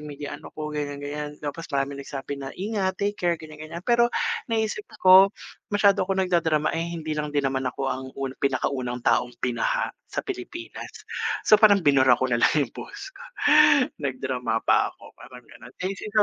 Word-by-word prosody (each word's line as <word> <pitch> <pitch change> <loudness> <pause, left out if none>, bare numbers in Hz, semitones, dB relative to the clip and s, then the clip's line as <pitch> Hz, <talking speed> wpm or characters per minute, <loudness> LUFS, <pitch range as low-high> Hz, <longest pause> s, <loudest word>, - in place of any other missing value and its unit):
media 145 -1 -7
ano - - -12
ko, 150 0 -5
ganiyan, 145 -1 -3
ganiyan. 145 +1 -4
Tapos 155 +3 -5
maraming 140 -1 -2
nagsabi 140 0 -6
na 135 - -5
ingat, 195 -1 -2
take 205 +1 -1
care, 175 -1 +1
ganiyan, 155 0 -11
ganiyan. 170 +3 -8
Pero 235 0 +4 0.4
naisip 225 - -1 0.2
ko 190 +1 +9 0.4
masyado 200 -1 +4
akong 190 0 +1
nagdadrama, 160 -4 +1
eh, 165 +1 -2
hindi 155 -1 -4
lang 150 0 -2
din 145 -1 0
naman 135 0 -1
ako 130 - -6
ang 130 0 -3
un 135 -1 -3
pinakaunang 130 -2 -1
taong 125 0 +2
binaha - - 0 0.2
sa - - -4
Pilipinas. 360 -3 -7 0.4
So 215 0 +6
parang 205 -5 +6
binura 130 -3 +5
ko 130 - -1
na 120 - +2
lang - - +4
'yong 120 - -14
post 405 -2 -9
ko. 480 - -14 0.8
Nag-drama 130 -4 -2
pa - - +3
ako, - - -16
parang - - -13
gano'n. - - -14
Eh, 190 - 0
isipin 210 +2 -8
155 Hz, 180 wpm, -25 LUFS, 135-195 Hz, 0.8 s, ko